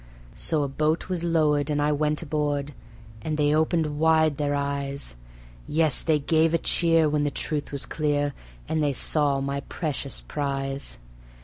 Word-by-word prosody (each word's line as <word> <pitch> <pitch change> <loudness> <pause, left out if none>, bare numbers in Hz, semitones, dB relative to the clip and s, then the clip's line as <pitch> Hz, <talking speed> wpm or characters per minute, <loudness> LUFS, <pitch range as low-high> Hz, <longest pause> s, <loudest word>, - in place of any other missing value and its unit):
So 155 -3 +1
a - - -1
boat 155 +6 -1
was 180 -2 -1
lowered 155 -4 +2
and 145 -1 0
I 145 +1 +2
went 150 +1 0
aboard, 145 -2 -2 0.5
and 155 +6 -3
they 150 0 +2
opened 155 -1 +1
wide 160 -2 +3
their 145 -1 0
eyes 140 - -2 0.5
Yes, 155 -2 +3
they 160 -2 +2
gave 160 +3 +2
a - - +4
cheer 165 -1 +2
when 150 0 0
the 145 - +1
truth 150 +1 -3
was 140 -3 -2
clear, 145 -1 -1 0.3
and 160 -1 0
they 145 -1 +1
saw 140 +1 +3
my 140 +1 -2
precious 140 -1 -4
prize. 140 -1 -4
150 Hz, 165 wpm, -25 LUFS, 140-155 Hz, 0.5 s, a